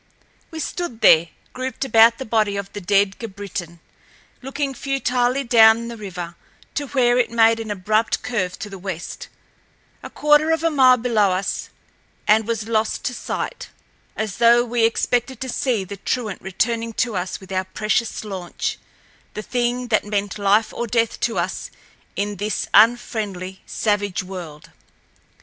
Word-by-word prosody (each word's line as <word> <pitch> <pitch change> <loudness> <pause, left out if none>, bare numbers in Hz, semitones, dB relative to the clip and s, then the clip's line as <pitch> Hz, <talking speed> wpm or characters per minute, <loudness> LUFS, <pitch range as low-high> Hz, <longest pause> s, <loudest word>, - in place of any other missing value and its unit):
We 320 - -7
stood 315 -8 -4
there, 165 +1 +6 0.3
grouped 260 +1 -4
about 230 -2 +6
the 265 - -6
body 215 -2 +1
of 200 0 -6
the 205 - -6
dead 195 +1 +2
Grabritin, 195 -6 -6 0.6
looking 270 +1 -3
futilely 255 -1 0
down 230 -1 +5
the 235 - -6
river 180 -5 -7 0.4
to 290 -1 -3
where 250 -3 +2
it 245 - +2
made 230 -1 +4
an 225 -1 -6
abrupt 215 +3 0
curve 210 -6 -2
to 210 - -7
the 195 - -8
west, 180 -2 -6 0.7
a - - -8
quarter 300 +1 +3
of 325 0 +1
a 330 - +2
mile 260 -3 +6
below 225 -4 +2
us, 190 +2 -3 0.6
and 220 +1 +4
was 225 -2 -2
lost 220 -1 0
to 250 - -1
sight, - - -5 0.5
as 215 -4 -3
though 235 +1 +5
we 235 -1 +1
expected 245 +2 0
to 260 - -3
see 240 -4 0
the 200 +2 -8
truant 215 -1 -3
returning 230 +4 -1
to 230 -1 -1
us 180 0 -3
with 190 0 -14
our 185 0 -1
precious 215 +4 -1
launch—the 195 +1 -7
thing 245 +1 -1
that 215 -2 +2
meant 205 0 -2
life 205 +2 +2
or 235 - -3
death 230 0 0
to 230 - -1
us - - -2 0.5
in 205 0 -2
this 210 +2 -2
unfriendly, 205 -4 +2
savage 205 -3 -1
world. 175 -5 -9
220 Hz, 155 wpm, -21 LUFS, 200-245 Hz, 0.7 s, there